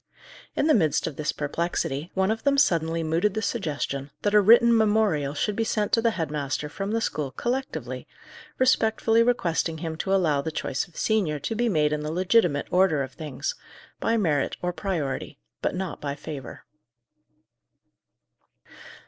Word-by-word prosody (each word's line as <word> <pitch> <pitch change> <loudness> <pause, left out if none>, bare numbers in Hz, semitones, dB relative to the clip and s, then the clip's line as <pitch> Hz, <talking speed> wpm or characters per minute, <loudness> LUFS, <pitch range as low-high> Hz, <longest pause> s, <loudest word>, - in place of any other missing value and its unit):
In - - +1
the 310 - +5
midst 160 - +2
of 160 - -4
this 155 +1 -1
perplexity, 155 0 -2
one 190 +2 +2
of 225 - -2
them 280 -1 +2
suddenly 165 - +2
mooted 170 +6 +1
the 220 - -1
suggestion 145 - -2
that 205 - +1
a 210 - +7
written 235 +3 +6
memorial 205 -10 +2
should 205 +7 -1
be 225 - 0
sent 210 -2 -1
to 230 - +3
the 230 - +3
head 160 -4 -2
master 150 0 -2
from 195 +6 -4
the 225 +1 0
school 150 -9 -2
collectively, 255 - -4 0.5
respectfully 225 -3 +3
requesting 170 -9 +1
him 160 0 -4
to 190 - -3
allow 165 -7 +2
the 160 - -4
choice 135 - -2
of 170 - -19
senior 200 -9 +1
to - - -2
be 235 +1 +1
made 150 -5 +2
in 150 - -2
the 150 +1 -3
legitimate 180 -4 +2
order 180 -6 +3
of 130 - -7
things, 155 - -4 0.5
by 230 - +1
merit 155 -10 0
or 180 0 -1
priority, 170 -8 -3 0.2
but - - -1
not 185 -3 -4
by 140 -1 -3
favour. 145 -4 -8
175 Hz, 170 wpm, -25 LUFS, 150-220 Hz, 0.5 s, a